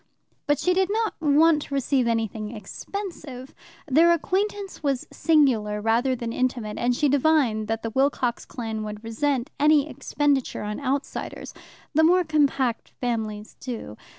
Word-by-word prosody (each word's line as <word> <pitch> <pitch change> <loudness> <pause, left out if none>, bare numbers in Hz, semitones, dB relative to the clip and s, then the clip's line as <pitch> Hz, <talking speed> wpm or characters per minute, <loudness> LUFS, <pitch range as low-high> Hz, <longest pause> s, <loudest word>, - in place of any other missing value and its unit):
But 290 0 +3
she 360 +5 +1
did 380 +1 +2
not 445 +1 0
want 305 +1 +4
to 280 - -5
receive 265 -2 +1
anything 225 -1 -2
expensive. 275 - -7 0.3
Their 325 +5 +5
acquaintance 390 +3 -2
was 275 -4 -1
singular 245 -10 +2
rather 235 +5 +1
than 235 -1 -4
intimate, 245 -4 -2
and 245 +1 +1
she 295 - +2
divined 275 -6 +2
that 225 0 -2
the 225 - -3
Wilcox 265 -2 0
clan 225 -3 -5
would 210 0 -7
resent 250 +3 -1
any 295 0 +4
expenditure 290 -5 -1
on 210 0 -4
outsiders; 280 0 -3 0.4
the 315 - +4
more 360 +3 +5
compact 280 -6 +1
families 220 -3 -3
do. 235 - -6
265 Hz, 145 wpm, -25 LUFS, 225-305 Hz, 0.4 s, Their